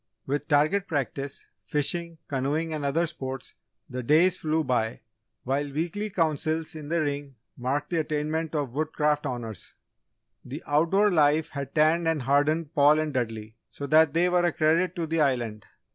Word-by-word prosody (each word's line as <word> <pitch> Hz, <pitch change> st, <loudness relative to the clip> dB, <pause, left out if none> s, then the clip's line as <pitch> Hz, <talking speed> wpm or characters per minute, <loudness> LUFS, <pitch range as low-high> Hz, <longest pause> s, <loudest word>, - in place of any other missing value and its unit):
With 145 Hz, +2 st, -2 dB
target 155 Hz, +7 st, +2 dB
practice, 140 Hz, -2 st, -3 dB, 0.2 s
fishing, 165 Hz, +5 st, -1 dB
canoeing, 150 Hz, +4 st, -1 dB
and 150 Hz, -2 st, -3 dB
other 150 Hz, +5 st, +1 dB
sports, 130 Hz, -4 st, -6 dB, 0.3 s
the 125 Hz, 0 st, -5 dB
days 160 Hz, +8 st, +4 dB
flew 160 Hz, -1 st, 0 dB
by, 115 Hz, -5 st, -1 dB, 0.4 s
while 140 Hz, +2 st, -1 dB
weekly 175 Hz, +8 st, -2 dB
councils 160 Hz, -2 st, -1 dB
in 155 Hz, -2 st, -8 dB
the 170 Hz, 0 st, +1 dB
Ring 145 Hz, -2 st, -3 dB, 0.2 s
marked 140 Hz, +5 st, -2 dB
the 170 Hz, -, +1 dB
attainment 155 Hz, +1 st, -2 dB
of 145 Hz, -5 st, -1 dB
Woodcraft 150 Hz, 0 st, 0 dB
Honours. 115 Hz, -6 st, -6 dB, 0.7 s
The -, -, -7 dB
outdoor 170 Hz, +8 st, +3 dB
life 155 Hz, -1 st, +3 dB
had 140 Hz, -2 st, -6 dB
tanned 160 Hz, +2 st, +3 dB
and 160 Hz, -5 st, 0 dB
hardened 145 Hz, +4 st, +1 dB
Paul 145 Hz, +1 st, +5 dB
and 155 Hz, -1 st, -1 dB
Dudley 110 Hz, -3 st, -3 dB
so 140 Hz, -, -7 dB
that 155 Hz, +1 st, +4 dB
they 175 Hz, +2 st, +4 dB
were 180 Hz, 0 st, +2 dB
a 175 Hz, -, +3 dB
credit 165 Hz, +5 st, +2 dB
to 170 Hz, -, -2 dB
the 160 Hz, 0 st, 0 dB
Island. 120 Hz, -7 st, -1 dB
150 Hz, 160 wpm, -27 LUFS, 140-160 Hz, 0.7 s, Paul